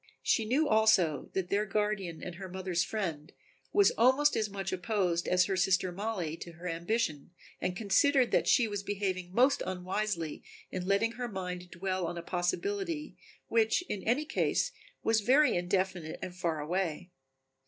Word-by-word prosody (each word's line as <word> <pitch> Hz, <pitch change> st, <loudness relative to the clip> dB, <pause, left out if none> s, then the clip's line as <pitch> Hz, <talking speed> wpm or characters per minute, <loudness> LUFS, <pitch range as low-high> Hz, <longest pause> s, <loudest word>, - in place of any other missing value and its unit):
She 225 Hz, -, +2 dB
knew 280 Hz, +8 st, +2 dB
also 205 Hz, -, +3 dB
that 190 Hz, -2 st, -2 dB
their 210 Hz, +1 st, +1 dB
guardian 195 Hz, -4 st, -1 dB
and 180 Hz, -, -5 dB
her 190 Hz, -1 st, -7 dB
mother's 185 Hz, -1 st, -1 dB
friend 170 Hz, -8 st, -4 dB, 0.4 s
was 405 Hz, -1 st, +5 dB
almost 260 Hz, +5 st, +5 dB
as 215 Hz, -1 st, 0 dB
much 195 Hz, -1 st, -4 dB
opposed 180 Hz, -2 st, 0 dB
as 180 Hz, 0 st, +4 dB
her 195 Hz, -, -1 dB
sister 185 Hz, 0 st, +2 dB
Mollie 185 Hz, -4 st, -3 dB
to 170 Hz, -, -9 dB
her 170 Hz, +2 st, -8 dB
ambition 170 Hz, -2 st, -1 dB, 0.3 s
and 180 Hz, -, -1 dB
considered 250 Hz, +5 st, +3 dB
that -, -, +2 dB
she 245 Hz, -4 st, +4 dB
was 205 Hz, -2 st, -3 dB
behaving 190 Hz, -3 st, -3 dB
most 255 Hz, +8 st, +3 dB
unwisely 185 Hz, -2 st, -3 dB, 0.3 s
in 185 Hz, -1 st, -4 dB
letting 200 Hz, +4 st, +2 dB
her 245 Hz, +1 st, -4 dB
mind 180 Hz, -3 st, -5 dB
dwell 185 Hz, 0 st, -2 dB
on 175 Hz, -, -5 dB
a 170 Hz, -, -5 dB
possibility 315 Hz, -, -2 dB, 0.3 s
which 225 Hz, +8 st, +2 dB
in 210 Hz, -, -4 dB
any 250 Hz, +9 st, +1 dB
case -, -, 0 dB, 0.3 s
was 225 Hz, -1 st, +3 dB
very 270 Hz, +8 st, +4 dB
indefinite 180 Hz, -2 st, -1 dB
and 180 Hz, -, -6 dB
far 170 Hz, -3 st, -1 dB
away. 175 Hz, +2 st, -2 dB
190 Hz, 165 wpm, -31 LUFS, 180-220 Hz, 0.4 s, was